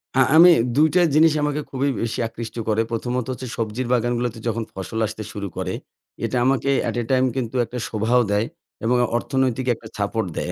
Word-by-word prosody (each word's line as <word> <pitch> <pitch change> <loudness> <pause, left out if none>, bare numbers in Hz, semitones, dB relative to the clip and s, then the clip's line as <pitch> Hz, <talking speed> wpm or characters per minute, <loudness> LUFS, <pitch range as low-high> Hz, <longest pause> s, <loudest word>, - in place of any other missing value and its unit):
হ্যাঁ, 130 -1 +5
আমি 175 +2 +9 0.3
২ 155 +2 +5
টা 180 - +6
জিনিস 160 0 +6
আমাকে 150 0 0
খুবই 135 +1 0
বেশি 115 -1 -2
আকৃষ্ট 115 0 -8
করে। 110 +1 +2
প্রথমত 120 +1 -2
হচ্ছে 130 0 -6
সবজির 115 +2 -2
বাগানগুলোতে 120 -1 0
যখন 115 0 -1
ফসল 95 +4 -5
আসতে 110 0 -5
শুরু 100 -1 -5
করে। - - -2 0.5
এটা 125 - -1
আমাকে 135 +1 +1
অ্যাট - - -2
এ - - -3
টাইম 130 0 +3
কিন্তু 125 -2 -3
একটা 125 - -7
শোভাও 115 +3 +2
দেয় 105 +2 +2 0.4
এবং 125 +2 +3 0.2
অর্থনৈতিক 130 0 -1
একটা 110 0 -13
সাপোর্ট 105 0 -1
দেয়। 90 - -2
120 Hz, 190 wpm, -22 LUFS, 110-130 Hz, 0.5 s, আমি